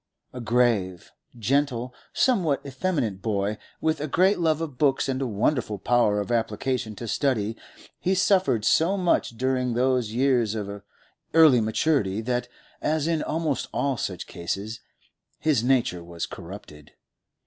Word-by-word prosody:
A 125 Hz, -, -6 dB
grave, 115 Hz, -7 st, +1 dB, 0.3 s
gentle, 125 Hz, +1 st, 0 dB, 0.2 s
somewhat 180 Hz, -, +1 dB
effeminate 130 Hz, -, -2 dB
boy, 105 Hz, -1 st, -1 dB, 0.2 s
with 160 Hz, -1 st, 0 dB
a 150 Hz, -, -2 dB
great 185 Hz, +7 st, +3 dB
love 160 Hz, -2 st, +2 dB
of 150 Hz, -6 st, -5 dB
books 140 Hz, -3 st, +2 dB
and 130 Hz, 0 st, -1 dB
a 135 Hz, -, 0 dB
wonderful 110 Hz, 0 st, 0 dB
power 110 Hz, -1 st, +2 dB
of 105 Hz, +3 st, -3 dB
application 115 Hz, 0 st, -1 dB
to 120 Hz, -, -7 dB
study, 110 Hz, -4 st, 0 dB, 0.4 s
he 190 Hz, +2 st, +1 dB
suffered 185 Hz, -, +2 dB
so 175 Hz, +9 st, +3 dB
much 175 Hz, -10 st, +1 dB
during 125 Hz, -1 st, 0 dB
those 125 Hz, -2 st, +1 dB
years 120 Hz, -3 st, +2 dB
of 100 Hz, -1 st, -5 dB, 0.5 s
early 155 Hz, -7 st, +7 dB
maturity, 110 Hz, -2 st, +1 dB
that, 125 Hz, +1 st, -1 dB, 0.3 s
as 155 Hz, -1 st, 0 dB
in 165 Hz, -2 st, 0 dB
almost 155 Hz, -3 st, -1 dB
all 140 Hz, -1 st, 0 dB
such -, -, -5 dB
eases, 100 Hz, +6 st, -4 dB, 0.6 s
his 145 Hz, -7 st, +1 dB
nature 120 Hz, -9 st, +1 dB
was 85 Hz, 0 st, -5 dB
corrupted. 85 Hz, -5 st, -11 dB
125 Hz, 140 wpm, -25 LUFS, 110-150 Hz, 0.6 s, early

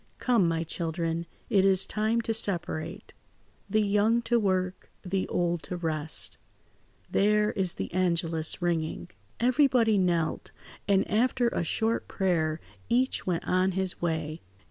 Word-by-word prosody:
"Come, 235 Hz, -8 st, +2 dB
my 165 Hz, 0 st, 0 dB
children, 165 Hz, 0 st, -2 dB, 0.2 s
it 200 Hz, -5 st, +3 dB
is 195 Hz, -1 st, +5 dB
time 220 Hz, +2 st, 0 dB
to 225 Hz, 0 st, -2 dB
separate. 180 Hz, -7 st, -1 dB, 0.6 s
The 215 Hz, 0 st, +2 dB
young 210 Hz, +3 st, +2 dB
to 235 Hz, 0 st, +2 dB
work, 185 Hz, -3 st, -1 dB, 0.2 s
the 190 Hz, +1 st, -1 dB
old 175 Hz, -1 st, 0 dB
to 180 Hz, -, -3 dB
rest. 160 Hz, -2 st, -3 dB, 0.7 s
There 210 Hz, +1 st, +3 dB
is 185 Hz, -3 st, -1 dB
the -, -, -5 dB
angelus 170 Hz, -3 st, 0 dB
ringing." 160 Hz, -, -1 dB, 0.3 s
Everybody 245 Hz, -4 st, +3 dB
knelt, 170 Hz, -3 st, 0 dB, 0.4 s
and 195 Hz, -1 st, +3 dB
after 240 Hz, +2 st, +2 dB
a 175 Hz, -, -2 dB
short 225 Hz, +6 st, 0 dB
prayer 165 Hz, -5 st, 0 dB, 0.3 s
each 255 Hz, -1 st, +1 dB
went 175 Hz, -2 st, -1 dB
on 185 Hz, +1 st, +2 dB
his 190 Hz, 0 st, -2 dB
way. 160 Hz, -2 st, -2 dB
185 Hz, 135 wpm, -28 LUFS, 170-215 Hz, 0.7 s, is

